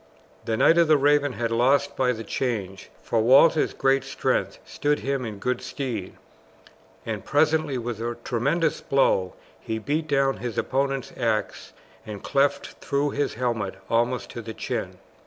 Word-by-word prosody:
The 110 -1 -1
Knight 165 +8 +5
of 170 - +5
the 155 -1 +5
Raven 145 -1 +3
had 115 +1 -2
lost 135 +5 +2
by 130 -1 +2
the 115 -2 -5
change, 100 -5 -3
for 115 - +1
Walter's 140 +7 +5
great 135 0 +2
strength - - -1
stood 145 0 -1
him 135 -1 -1
in 110 -2 -6
good 125 +5 -2
stead, 115 -9 -5 0.9
and 110 -4 -4
presently 155 0 +1
with 120 -2 -4
a 120 0 -3
tremendous 145 +7 0
blow 95 -9 +2 0.3
he 110 - -4
beat 150 +8 -2
down 135 -2 +2
his 120 -2 -5
opponent's 135 0 -1
axe 115 -3 -2 0.3
and 105 -2 -8
cleft 140 +1 0
through 140 +1 0
his 145 - -2
helmet 115 -5 -2 0.2
almost 120 +2 0
to 120 - -6
the 110 -1 -8
chin. - - -4
125 Hz, 155 wpm, -25 LUFS, 115-140 Hz, 0.9 s, Knight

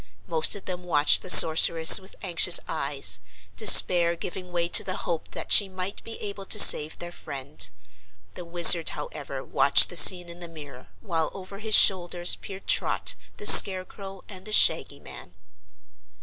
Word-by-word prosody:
Most 160 +2 -5
of 200 - -13
them 180 -1 -11
watched 150 -4 -2
the - - -12
Sorceress 160 0 +5
with 190 0 -17
anxious 175 -1 +2
eyes, 140 -9 -2 0.4
despair 170 - +2
giving 180 +2 -12
way 170 -1 -5
to - - +1
the 185 - -9
hope 165 -2 -9
that - - -9
she 200 -2 +2
might 185 +1 -11
be 225 - -11
able 200 -2 -11
to - - -1
save 150 +1 +4
their 175 0 -12
friend. 130 - -5 0.6
The - - -14
Wizard, 170 -1 +3
however, - - -12
watched - - 0
the - - -12
scene 180 -2 +3
in 170 0 -16
the 175 - -13
mirror, 145 - -17
while 160 +6 -7
over 195 +1 -14
his 220 0 -1
shoulders 175 -2 +1
peered 195 0 -15
Trot, - - -3 0.2
the 420 - -13
Scarecrow 195 - +3
and 185 -2 -15
the 215 - -13
Shaggy - - -1
Man. 90 - -16
175 Hz, 165 wpm, -20 LUFS, 160-190 Hz, 0.6 s, Sorceress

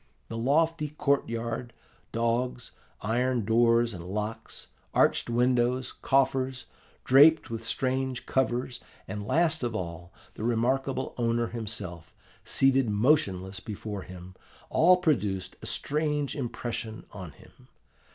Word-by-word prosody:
The 115 - -5
lofty 150 +5 +1
court 140 -3 0
yard, 115 +1 -4 0.4
dogs, 120 +1 -1 0.3
iron 120 +1 0
doors 115 +1 +3
and 85 -3 -7
locks, 105 +5 -5 0.3
arched - - +3
windows, 125 +1 +2
coffers, 130 -1 0 0.4
draped 145 +1 +6
with 115 0 -4
strange 130 +1 -1
covers, 125 -1 0 0.3
and, 105 +1 -5
last 160 +1 +2
of 120 -2 -2
all, 85 -3 -5 0.2
the - - -7
remarkable 130 +3 0
owner 115 -1 +1
himself, 105 -7 -6 0.3
seated 135 -3 +3
motionless 100 -5 +1
before 105 -2 -6
him, 90 0 -10 0.4
all 180 +3 +6
produced 105 - 0
a - - -7
strange 150 -1 -1
impression 120 -4 -4
on 90 -7 -8
him. - - -19
120 Hz, 115 wpm, -28 LUFS, 110-135 Hz, 0.4 s, draped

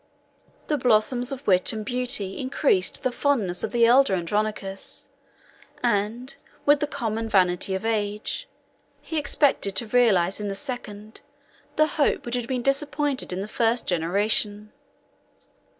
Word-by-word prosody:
The 300 -2 -1
blossoms 245 +1 +2
of 275 0 -6
wit 185 -2 +3
and 215 -1 -5
beauty 245 -5 -1
increased 260 -7 +1
the 255 - +1
fondness 225 -11 0
of - - -2
the 235 -1 +4
elder 245 -3 +5
Andronicus; 195 +2 -3 0.7
and, 235 +3 -1 0.3
with 290 0 +5
the 295 - -1
common 225 -4 -3
vanity 185 -1 +2
of 190 - -4
age, 215 - -2 0.6
he 320 - -2
expected 280 -8 +1
to 235 - 0
realize 215 -6 +3
in 210 - -3
the 195 - -3
second, 215 -4 -6 0.5
the 310 - +4
hope 305 -1 0
which 240 - -5
had 245 -2 -2
been 250 -1 -2
disappointed 285 -1 0
in 180 +1 -3
the 200 - -5
first, 230 +2 0
generation. 205 +4 0
225 Hz, 140 wpm, -25 LUFS, 200-255 Hz, 0.7 s, elder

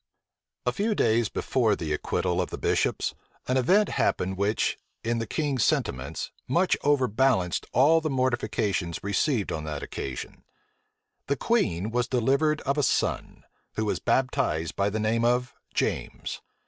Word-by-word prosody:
A 125 - +2
few 210 - 0
days 115 - +2
before 115 -5 +1
the 80 -4 -3
acquittal 90 +3 0
of - - -3
the - - -5
bishops, - - 0 0.3
an 130 - +1
event 185 +12 +4
happened 95 +1 0
which, 100 +3 0 0.2
in 115 +1 0
the 115 - -3
king's 140 -5 0
sentiments, 65 +2 -1 0.2
much 175 +8 +3
overbalanced 130 -8 +2
all 160 +5 +5
the 155 - -1
mortifications 110 - -1
received 100 +3 0
on 80 - -3
that 75 -2 -4
occasion. 65 -2 -6 0.8
The 140 - 0
queen 110 - 0
was 120 +1 0
delivered 140 +6 +2
of 140 +2 0
a - - +4
son, - - -1 0.3
who 110 - -1
was 105 - -1
baptized 125 - 0
by 100 +1 +1
the 110 +2 -2
name 110 +2 +1
of 125 +1 +1 0.2
James. - - -2
120 Hz, 150 wpm, -27 LUFS, 100-135 Hz, 0.8 s, all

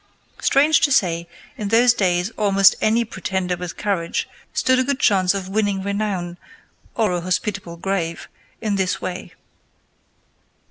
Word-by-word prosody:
Strange 295 +3 +4
to 285 - +3
say, 170 -8 +1 0.3
in 210 - -2
those 230 +3 +5
days 180 -1 0
almost 195 -2 +4
any 230 +2 +2
pretender 190 -4 -3
with 175 -1 -7
courage 190 -5 -2 0.2
stood 255 0 +2
a - - +3
good 280 +1 -1
chance 190 -4 +3
of 190 -1 -4
winning 200 -1 -1
renown 200 -4 -3 0.6
or 220 -4 +1
a 175 -1 -1
hospitable 185 -1 -3
grave 170 -3 -3 0.3
in 210 -3 -1
this 190 -1 0
way. 185 0 -6
195 Hz, 140 wpm, -21 LUFS, 180-215 Hz, 0.6 s, those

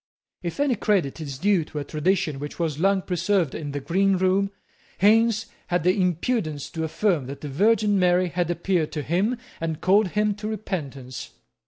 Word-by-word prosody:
If 175 +7 -5
any 285 -2 +3
credit 195 - 0
is 140 -4 -5
due 190 +2 +2
to 150 - -9
a 145 - -1
tradition 155 -1 0
which 145 +1 -6
was 160 -4 -2
long 195 +1 +2
preserved 180 -3 0
in 145 -2 -5
the 145 - -3
green 190 +6 +2
room, 190 +2 +2 0.5
Haines 220 +2 +4 0.2
had 175 -2 0
the 180 +1 +4
impudence 180 - -1
to 160 - -3
affirm 160 -3 0
that 140 +1 -7
the 150 - -5
Virgin 205 +6 +3
Mary 180 0 +3
had 175 0 -1
appeared 175 -2 0
to 150 - -3
him 195 - 0 0.2
and 160 -1 -3
called 200 +2 +4
him 210 +3 +1
to 210 0 -5
repentance. 140 - -5
180 Hz, 180 wpm, -24 LUFS, 155-200 Hz, 0.5 s, Haines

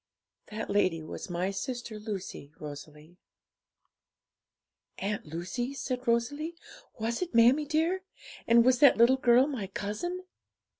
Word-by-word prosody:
'That 220 +1 -5
lady 185 -5 +1
was 155 - -7
my 180 +2 -1
sister 240 +1 -5
Lucy, 195 -9 -6
Rosalie.' 150 +3 -10 1.8
'Aunt 200 -3 -3
Lucy?' 185 - -4
said 255 -2 -4
Rosalie; 285 +8 0 0.4
'was 230 +4 -2
it, 350 -9 -3
mammie 250 +6 +5
dear? 330 +5 +1 0.5
And 235 0 +6
was 255 -1 +4
that 285 - +7
little 240 +3 +6
girl 250 -1 +5
my 255 -9 -4
cousin?' 210 - -4
235 Hz, 120 wpm, -29 LUFS, 195-265 Hz, 1.8 s, that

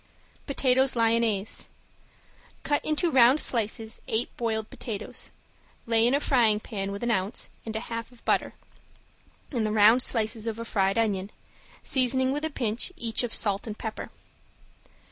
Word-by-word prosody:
~POTATOES 265 -2 +2
LYONNAISE~ 225 -3 +1 1.0
Cut 290 - 0
into 310 +2 0
round 260 +2 +6
slices 225 -3 -1
eight 220 +2 -1
boiled 220 -2 -2
potatoes, 215 -4 -4 0.6
lay 230 0 +3
in 255 - +3
a - - +2
frying 235 -7 +3
pan 200 -3 -5
with 200 +3 -6
an 240 - +1
ounce 195 0 -1 0.2
and 220 - -4
a 220 - -2
half 230 0 -6
of 245 - -21
butter - - +1 1.0
and 240 -6 -1
the 215 - 0
round 220 +3 +6
slices 225 -2 0
of 225 -1 -3
a 230 - -5
fried 195 -2 +1
onion, 200 -4 0 0.5
seasoning 260 0 +2
with 295 +2 -2
a 315 - 0
pinch 240 - -1
each 230 -7 0
of 245 -2 -3
salt 205 -1 0
and 215 -1 -6
pepper. 220 -1 -6
230 Hz, 155 wpm, -27 LUFS, 215-250 Hz, 1.0 s, round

